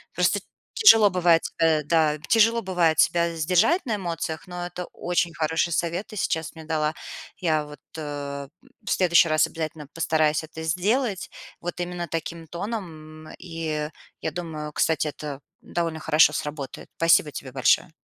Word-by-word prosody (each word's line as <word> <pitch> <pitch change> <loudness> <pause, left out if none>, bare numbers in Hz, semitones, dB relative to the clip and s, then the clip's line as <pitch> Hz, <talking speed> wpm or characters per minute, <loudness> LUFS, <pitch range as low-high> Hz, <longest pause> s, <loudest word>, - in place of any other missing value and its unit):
Просто - - +2 0.3
тяжело 225 - +7
бывает 175 -2 +3
себя 160 -2 +2
да, 155 -1 +2
тяжело 230 +1 +4
бывает 175 -4 +2
себя 170 -1 +3
сдержать 180 - +2
на 225 -4 -1
эмоциях, 165 -3 -4
но 180 -1 -5
это 180 0 -6
очень 175 -1 -1
хороший 160 +2 0
совет 170 +5 -1
ты - - -10
сейчас 160 -5 -2
мне 160 - -10
дала. 155 -1 0 0.4
Я 155 -4 0
вот, 150 -1 -12 0.2
э, 145 -2 -5 0.4
в - - -4
следующий 170 -2 +4
раз 155 0 +4
обязательно 160 -2 -6
постараюсь 155 -1 +1
это 160 0 -8
сделать 195 - 0 0.3
вот 175 +1 -5
именно 175 0 -3
таким 165 +1 -5
тоном. 160 -5 -6
И 160 -3 -4 0.3
я 160 - -2
думаю, 155 -2 -5
кстати, 155 0 +1
это 145 -1 -6 0.2
довольно 165 -2 -3
хорошо 155 -1 +4
сработает. 145 -2 -5
Спасибо 165 -2 +4
тебе 130 -2 -7
большое. 135 +5 +2
165 Hz, 150 wpm, -25 LUFS, 155-175 Hz, 0.4 s, тяжело